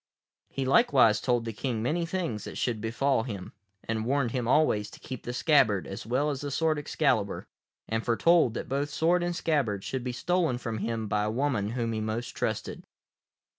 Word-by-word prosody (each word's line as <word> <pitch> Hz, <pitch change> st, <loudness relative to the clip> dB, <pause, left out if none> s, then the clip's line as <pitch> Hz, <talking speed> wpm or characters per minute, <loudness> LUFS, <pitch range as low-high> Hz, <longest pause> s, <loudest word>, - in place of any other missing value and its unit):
He 135 Hz, -, -3 dB
likewise 130 Hz, -, +4 dB
told 120 Hz, -2 st, +1 dB
the 115 Hz, -, -4 dB
King 115 Hz, 0 st, -2 dB
many 165 Hz, +7 st, 0 dB
things 165 Hz, -, -3 dB
that -, -, -7 dB
should 115 Hz, -4 st, -1 dB
befall 125 Hz, +3 st, +1 dB
him, 105 Hz, -6 st, -6 dB, 0.3 s
and 110 Hz, -1 st, -2 dB
warned 130 Hz, 0 st, +1 dB
him 125 Hz, -2 st, -2 dB
always 115 Hz, -7 st, +3 dB
to -, -, -13 dB
keep 130 Hz, -3 st, -7 dB
the 120 Hz, -, -5 dB
scabbard 125 Hz, -, +3 dB
as 100 Hz, +4 st, -7 dB
well 140 Hz, +5 st, +1 dB
as 135 Hz, -, -4 dB
the 145 Hz, -, -3 dB
sword 155 Hz, +2 st, +1 dB
Excalibur, 135 Hz, -8 st, 0 dB, 0.4 s
and 110 Hz, 0 st, -1 dB
foretold 125 Hz, +1 st, +3 dB
that -, -, -4 dB
both 140 Hz, +2 st, -1 dB
sword 170 Hz, +4 st, +2 dB
and 175 Hz, 0 st, -1 dB
scabbard 135 Hz, -, 0 dB
should 130 Hz, -2 st, -3 dB
be 125 Hz, -, -2 dB
stolen 165 Hz, +1 st, 0 dB
from 115 Hz, -3 st, -4 dB
him 115 Hz, 0 st, -2 dB
by 105 Hz, 0 st, 0 dB
a -, -, 0 dB
woman 120 Hz, -3 st, 0 dB
whom 115 Hz, -2 st, -1 dB
he 110 Hz, -, -2 dB
most 110 Hz, +2 st, -3 dB
trusted. -, -, -3 dB
125 Hz, 195 wpm, -28 LUFS, 110-145 Hz, 0.4 s, likewise